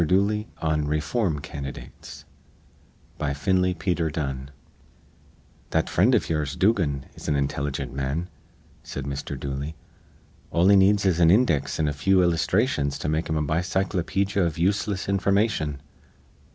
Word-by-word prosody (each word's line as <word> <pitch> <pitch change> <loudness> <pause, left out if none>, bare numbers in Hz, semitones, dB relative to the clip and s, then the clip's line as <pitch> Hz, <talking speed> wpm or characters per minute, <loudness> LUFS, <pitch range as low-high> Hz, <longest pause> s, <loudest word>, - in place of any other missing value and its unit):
DOOLEY 100 +6 +1 0.2
ON 75 -2 +1
REFORM 75 - 0
CANDIDATES 70 -3 -8 0.9
BY 75 -2 -1
FINLEY 90 +4 +1
PETER 85 -1 -1
DUNNE 70 -3 -4 1.2
"That 80 0 0
frind 115 +9 +4
iv 110 - +1
ye'ers, 75 -3 -1
Dugan, 85 -10 +1
is - - -10
an 75 - +1
intilligent 70 -1 -2
man," 70 +6 -2 0.5
said 70 - -6
Mr. 70 0 -5
Dooley. 70 +3 -4 0.7
"All 85 +2 +3
he 100 - +7
needs 100 +1 +4
is 90 -3 +2
an 85 -1 +6
index 95 - +2
an' 80 - +2
a 75 - 0
few 95 +6 +3
illusthrations 85 - +1
to - - -3
make 80 +2 -1
him 80 - 0
a 75 - 0
bicyclopedja 95 +4 0
iv 80 - -5
useless 100 +2 0
information." 100 -6 +1
80 Hz, 140 wpm, -25 LUFS, 75-95 Hz, 1.2 s, he